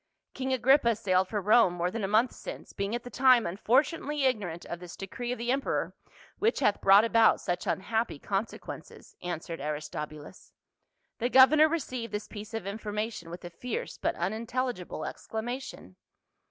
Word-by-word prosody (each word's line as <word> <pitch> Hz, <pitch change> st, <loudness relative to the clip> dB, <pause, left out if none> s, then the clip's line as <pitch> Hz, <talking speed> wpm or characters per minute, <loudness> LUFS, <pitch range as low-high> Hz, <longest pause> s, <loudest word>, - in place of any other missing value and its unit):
" -, -, -59 dB
King 265 Hz, 0 st, -3 dB
Agrippa 260 Hz, -1 st, +4 dB
sailed 185 Hz, -2 st, +1 dB
for 210 Hz, +2 st, -2 dB
Rome 210 Hz, -1 st, +5 dB
more 175 Hz, +1 st, -1 dB
than 225 Hz, 0 st, -4 dB
a -, -, +1 dB
month 220 Hz, +5 st, +3 dB
since, -, -, -9 dB
being 200 Hz, +3 st, -2 dB
at 240 Hz, -, -4 dB
the 245 Hz, -, -9 dB
time 255 Hz, -2 st, +5 dB
unfortunately 275 Hz, -, +1 dB
ignorant 200 Hz, -10 st, -1 dB
of 170 Hz, -, -6 dB
this 180 Hz, -1 st, -10 dB
decree 240 Hz, +5 st, -5 dB
of 250 Hz, -, -2 dB
the 235 Hz, +1 st, -1 dB
emperor 275 Hz, +1 st, -1 dB, 0.5 s
which 450 Hz, +3 st, +2 dB
hath 210 Hz, -7 st, +2 dB
brought 200 Hz, +3 st, +7 dB
about 230 Hz, -1 st, +4 dB
such 175 Hz, 0 st, -3 dB
unhappy 220 Hz, 0 st, -1 dB
consequences," 195 Hz, +8 st, -5 dB
answered 170 Hz, -2 st, -5 dB
Aristobulus. 150 Hz, +2 st, -6 dB, 0.7 s
The 245 Hz, +1 st, 0 dB
governor 300 Hz, +5 st, +7 dB
received 255 Hz, -8 st, -3 dB
this 210 Hz, 0 st, -3 dB
piece 215 Hz, +1 st, -8 dB
of 225 Hz, -4 st, -4 dB
information 210 Hz, -2 st, -4 dB
with 175 Hz, +1 st, -8 dB
a 175 Hz, -, -7 dB
fierce 240 Hz, +7 st, -5 dB
but -, -, 0 dB
unintelligible 220 Hz, -1 st, -3 dB
exclamation. 230 Hz, -, -6 dB
220 Hz, 165 wpm, -29 LUFS, 185-250 Hz, 0.7 s, brought